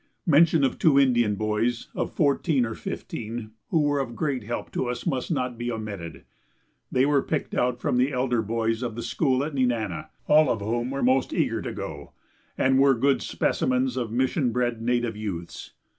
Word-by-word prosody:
Mention 160 Hz, -2 st, +5 dB
of 135 Hz, -, 0 dB
two 140 Hz, -4 st, +5 dB
Indian 120 Hz, -6 st, +3 dB
boys 110 Hz, +3 st, -1 dB
of -, -, -2 dB
fourteen 140 Hz, -2 st, +2 dB
or 115 Hz, -, -4 dB
fifteen, 110 Hz, 0 st, -6 dB, 0.2 s
who 160 Hz, -, +2 dB
were 145 Hz, -1 st, +1 dB
of 125 Hz, -4 st, -3 dB
great 135 Hz, -5 st, -1 dB
help 120 Hz, +2 st, -4 dB
to 130 Hz, -, -2 dB
us, 125 Hz, 0 st, -4 dB
must 130 Hz, -2 st, -1 dB
not 125 Hz, -7 st, -2 dB
be 120 Hz, 0 st, -2 dB
omitted. 105 Hz, -7 st, -6 dB, 0.7 s
They 130 Hz, +1 st, +3 dB
were 145 Hz, -1 st, +3 dB
picked 155 Hz, +1 st, -3 dB
out 125 Hz, 0 st, 0 dB
from 125 Hz, -, 0 dB
the 130 Hz, +3 st, +2 dB
elder 125 Hz, -2 st, +1 dB
boys 115 Hz, +1 st, -1 dB
of 120 Hz, -3 st, -3 dB
the 120 Hz, -, -5 dB
school 135 Hz, -3 st, +1 dB
at 150 Hz, +1 st, -4 dB
Nenana, 125 Hz, +2 st, -1 dB, 0.2 s
all 150 Hz, -2 st, +5 dB
of 115 Hz, -, 0 dB
whom 120 Hz, +4 st, -2 dB
were 135 Hz, +1 st, -2 dB
most 130 Hz, +1 st, +2 dB
eager -, -, 0 dB
to -, -, -4 dB
go, -, -, -7 dB, 0.4 s
and 130 Hz, 0 st, +3 dB
were 135 Hz, -1 st, +5 dB
good 135 Hz, +3 st, +2 dB
specimens 130 Hz, 0 st, 0 dB
of 120 Hz, -4 st, -2 dB
mission 130 Hz, +2 st, +1 dB
bred 120 Hz, -1 st, -1 dB
native 120 Hz, -1 st, 0 dB
youths. 95 Hz, -6 st, -6 dB
125 Hz, 190 wpm, -25 LUFS, 115-135 Hz, 0.7 s, Mention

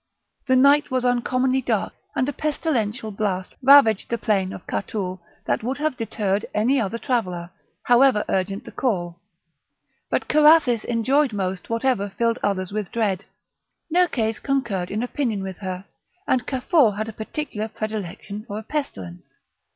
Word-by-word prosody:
The 260 Hz, -, +4 dB
night 280 Hz, +3 st, +5 dB
was 255 Hz, -1 st, 0 dB
uncommonly 255 Hz, +2 st, +1 dB
dark, -, -, -1 dB, 0.2 s
and 255 Hz, -, +1 dB
a 290 Hz, -, -2 dB
pestilential 250 Hz, -8 st, -1 dB
blast 195 Hz, -3 st, -2 dB
ravaged 260 Hz, -6 st, +6 dB
the 235 Hz, -, 0 dB
plain 200 Hz, -4 st, 0 dB
of 180 Hz, -, -9 dB
Catoul 190 Hz, -3 st, -3 dB, 0.3 s
that -, -, 0 dB
would 255 Hz, +4 st, -2 dB
have 305 Hz, -2 st, -1 dB
deterred 210 Hz, -3 st, -1 dB
any 250 Hz, +5 st, +3 dB
other 220 Hz, +2 st, -2 dB
traveller, 185 Hz, -9 st, -2 dB, 0.3 s
however 245 Hz, -3 st, +4 dB
urgent 195 Hz, +1 st, -1 dB
the -, -, -9 dB
call; 175 Hz, -9 st, -2 dB, 0.9 s
but -, -, -1 dB
Carathis 300 Hz, -6 st, +5 dB
enjoyed 255 Hz, +3 st, +2 dB
most 190 Hz, -2 st, -3 dB
whatever 230 Hz, -3 st, 0 dB
filled 230 Hz, +3 st, 0 dB
others 185 Hz, -2 st, -1 dB
with 210 Hz, -2 st, -3 dB
dread. 210 Hz, -4 st, -1 dB, 0.7 s
Nerkes 245 Hz, -12 st, +2 dB
concurred 235 Hz, -10 st, -1 dB
in 215 Hz, +3 st, -2 dB
opinion 240 Hz, -6 st, -2 dB
with 190 Hz, -2 st, -6 dB
her, 185 Hz, -1 st, -5 dB, 0.4 s
and 250 Hz, -1 st, +1 dB
Cafour 260 Hz, -, +2 dB
had 215 Hz, +1 st, -2 dB
a 225 Hz, -, -6 dB
particular 220 Hz, 0 st, -4 dB
predilection 215 Hz, -2 st, -5 dB
for 205 Hz, -2 st, -5 dB
a 220 Hz, -, -6 dB
pestilence. 95 Hz, -, -6 dB
225 Hz, 150 wpm, -23 LUFS, 200-260 Hz, 0.9 s, ravaged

